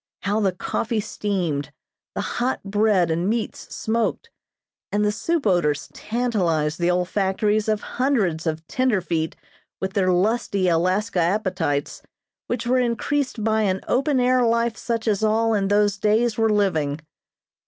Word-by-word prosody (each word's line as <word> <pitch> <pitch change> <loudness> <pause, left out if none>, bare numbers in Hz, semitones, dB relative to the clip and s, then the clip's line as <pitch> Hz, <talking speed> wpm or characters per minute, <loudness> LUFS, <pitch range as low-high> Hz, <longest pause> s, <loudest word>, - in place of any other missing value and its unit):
How 205 +2 0
the 200 -3 +2
coffee 225 +5 -2
steamed, 180 -9 -2 0.4
the - - -1 0.2
hot 255 +2 -1
bread 200 -4 +2
and 170 +4 0
meats 225 0 -3
smoked, 225 +1 -1 0.6
and 210 +1 +1
the 210 - +2
soup 330 +7 -1
odors 175 -7 +1
tantalized 180 -10 -1
the 175 0 +2
olfactories 195 +4 +1
of 215 -1 +1
hundreds 205 - 0
of 160 0 -2
"tenderfeet" 185 -9 0 0.4
with 190 0 -3
their 190 -3 +2
lusty 200 0 +1
Alaska 185 +4 +1
appetites, 175 -5 -1 0.5
which 240 -1 -2
were 255 +2 +2
increased 250 0 -1
by 220 0 +2
an 190 -2 0
open 270 +1 +2
air 250 0 +3
life 230 0 +1
such 230 -1 -3
as 210 -2 +1
all 225 +1 +2
in 200 -2 +1
those 205 0 +2
days 215 +2 +2
were 225 0 +2
living. 160 -9 +1
205 Hz, 145 wpm, -23 LUFS, 180-230 Hz, 0.6 s, air